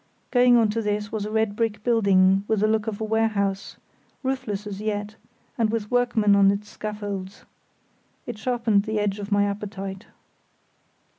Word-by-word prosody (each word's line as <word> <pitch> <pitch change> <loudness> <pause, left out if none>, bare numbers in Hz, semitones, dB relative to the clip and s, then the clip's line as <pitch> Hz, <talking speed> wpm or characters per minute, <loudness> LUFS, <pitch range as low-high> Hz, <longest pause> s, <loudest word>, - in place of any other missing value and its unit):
Going 245 -1 +5
on 225 -2 +3
to 225 +2 -1
this 210 -1 -2
was 210 -2 -3
a - - -6
red 220 -2 0
brick 215 -2 -1
building 195 -5 +4
with 220 -2 +1
the 215 - +4
look 220 0 0
of 210 -2 -3
a - - -3
warehouse, 215 -3 -1 0.5
roofless 255 -6 -3
as 205 -1 -6
yet, 210 0 -3 0.4
and 225 -2 +3
with 215 -2 -3
workmen 240 -4 +3
on 200 -1 +5
its 200 +1 -2
scaffolds. 205 -2 -6 0.8
It 235 -3 -6
sharpened 225 -3 +1
the 220 -1 -2
edge 205 0 -1
of 205 +1 -7
my 205 0 +3
appetite. 200 -1 -5
210 Hz, 165 wpm, -24 LUFS, 200-220 Hz, 0.8 s, Going